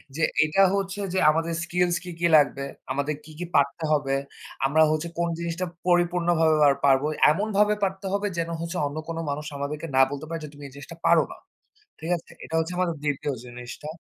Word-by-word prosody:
যে 160 - -1 0.2
এটা 155 +6 +2
হচ্ছে 195 0 -2
যে 190 - +2
আমাদের 165 +2 -1
স্কিলস 175 0 +1
কি, 180 - -7
কি 170 - +3
লাগবে, 140 -2 +2 0.3
আমাদের 140 +3 -1
কি, 160 - -12
কি 175 - -3
পারতে 140 +3 +2
হবে। 140 -2 0 0.5
আমরা 150 +4 +3
হচ্ছে 155 +2 -1
কোন 170 - +1
জিনিসটা 170 +2 -2 0.2
পরিপূর্ণভাবে 175 -2 +3 0.3
পারবো? 135 0 +4 0.3
এমনভাবে 210 +4 +2
পারতে 195 0 -2
হবে 200 +1 0
যেন 165 0 -1
হচ্ছে 170 +2 -4
অন্য 145 +2 -7
কোনো 165 0 -3
মানুষ 145 +1 -3
আমাদেরকে 150 +3 -4
না 135 - +6
বলতে 145 +2 -5
পারে 165 0 -3
যে, 150 - -7
"তুমি 145 0 -12
এই 135 - -15
জিনিসটা 140 +4 -10
পারো - - +6
না।" - - -15 0.6
ঠিক 160 - -6
আছে? 165 - -15
এটা 160 - -5
হচ্ছে 160 +2 -2
আমাদের 180 -2 0
২য় 145 -1 -1
জিনিসটা। 125 +4 -9
165 Hz, 195 wpm, -25 LUFS, 145-175 Hz, 0.6 s, না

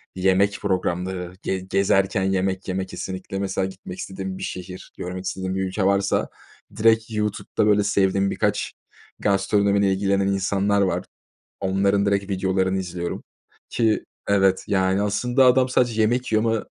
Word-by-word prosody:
yemek 95 +2 +2
programları, 90 -1 -2
ge 95 - -1
gezerken 95 0 +1
yemek 95 0 -1
yemek 95 0 -2
kesinlikle, 95 +1 -5
mesela, 95 -1 -1
gitmek 95 -1 -8
istediğim 95 -1 -5
bir 95 - -7
şehir, 90 0 -7
görmek 90 +1 -5
istediğim 95 0 -3
bir 95 - -1
ülke 95 +1 -2
varsa 100 +1 +1 0.5
direkt 110 +1 +3
YouTube'da, 105 -1 -1
böyle, 105 -1 +4
sevdiğim 100 -1 +2
birkaç - - -1 0.5
gastronomiyle 100 0 +2
ilgilenen 100 0 +1
insanlar 100 +1 +1
var. 95 -2 0 0.6
Onların 100 +1 +1
direkt 100 0 0
videolarını 95 0 0
izliyorum 90 -2 -4 0.5
ki, 110 -2 +1 0.2
evet, 95 -2 +3
yani, 95 0 +1
aslında, 120 +6 +2
adam 130 0 +4
sadece 120 -3 +1
yemek 120 +3 +1
yiyor 110 0 +3
ama 115 -1 0
95 Hz, 140 wpm, -23 LUFS, 95-100 Hz, 0.6 s, böyle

